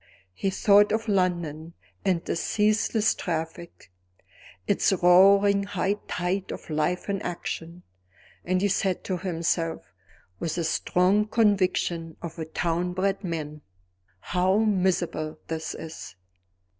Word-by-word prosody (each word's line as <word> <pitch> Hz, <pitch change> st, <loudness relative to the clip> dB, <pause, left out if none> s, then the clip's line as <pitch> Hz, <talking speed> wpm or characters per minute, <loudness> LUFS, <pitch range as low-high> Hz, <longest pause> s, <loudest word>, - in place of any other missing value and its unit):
He 195 Hz, -, -1 dB
thought 205 Hz, +1 st, +4 dB
of 220 Hz, +1 st, -1 dB
London 170 Hz, -5 st, -1 dB, 0.3 s
and 180 Hz, -3 st, 0 dB
its 165 Hz, -, -1 dB
ceaseless 215 Hz, +1 st, +2 dB
traffic, 165 Hz, -, -5 dB, 0.7 s
its -, -, +2 dB
roaring 195 Hz, +2 st, +5 dB
high 200 Hz, 0 st, -1 dB
tide 180 Hz, +2 st, -2 dB
of -, -, -8 dB
life 155 Hz, +4 st, -1 dB
in 200 Hz, -1 st, -2 dB
action 170 Hz, 0 st, -5 dB, 0.6 s
and 185 Hz, +2 st, 0 dB
he -, -, +4 dB
said 190 Hz, -1 st, 0 dB
to 185 Hz, -, -2 dB
himself, 165 Hz, -, -2 dB, 0.5 s
with 160 Hz, -2 st, -2 dB
the 170 Hz, -, -1 dB
strong 180 Hz, +5 st, +2 dB
conviction 185 Hz, -6 st, +1 dB
of 170 Hz, 0 st, -8 dB
a 160 Hz, -, -3 dB
town 170 Hz, +2 st, -1 dB
bred 195 Hz, +2 st, -1 dB
man: 155 Hz, -4 st, -4 dB, 0.6 s
How 185 Hz, +2 st, +1 dB
miserable 180 Hz, -7 st, 0 dB
this 160 Hz, -1 st, -4 dB
is! 160 Hz, -, -9 dB
180 Hz, 120 wpm, -26 LUFS, 165-195 Hz, 0.7 s, roaring